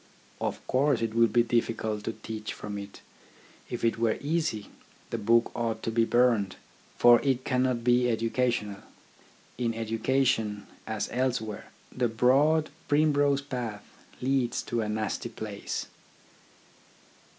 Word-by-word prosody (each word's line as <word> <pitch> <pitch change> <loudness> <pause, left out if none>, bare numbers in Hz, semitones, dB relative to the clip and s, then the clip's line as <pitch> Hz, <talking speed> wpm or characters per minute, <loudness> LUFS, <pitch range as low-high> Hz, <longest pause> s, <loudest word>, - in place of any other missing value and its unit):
Of - - -3
course 130 -2 +2
it 110 -1 -1
will 115 0 +5
be 120 +1 +3
difficult 110 -3 -1
to 115 - -2
teach 110 0 -6
from 105 -1 -6
it. 100 0 -10 0.7
If 120 -1 -2
it 115 0 +1
were 115 -1 +2
easy, 150 -8 -2 0.4
the - - -2
book 115 +3 +3
ought 115 -1 -2
to 115 - -1
be 115 0 +3
burned; 115 -6 +2 0.4
for 120 -1 +7
it 130 -2 0
cannot 125 -2 +1
be 125 0 +3
educational. 115 -3 0 0.8
In 115 -2 0
education, 115 -1 0 0.2
as 110 -2 -2
elsewhere, 120 -4 -2 0.3
the 125 -1 +2
broad 140 +7 +3 0.2
primrose 145 -2 +3
path 120 -7 -5 0.4
leads 130 -2 0
to 120 -1 -2
a 105 - -2
nasty 110 +2 -2
place. 110 -3 -5
115 Hz, 130 wpm, -28 LUFS, 110-130 Hz, 0.8 s, for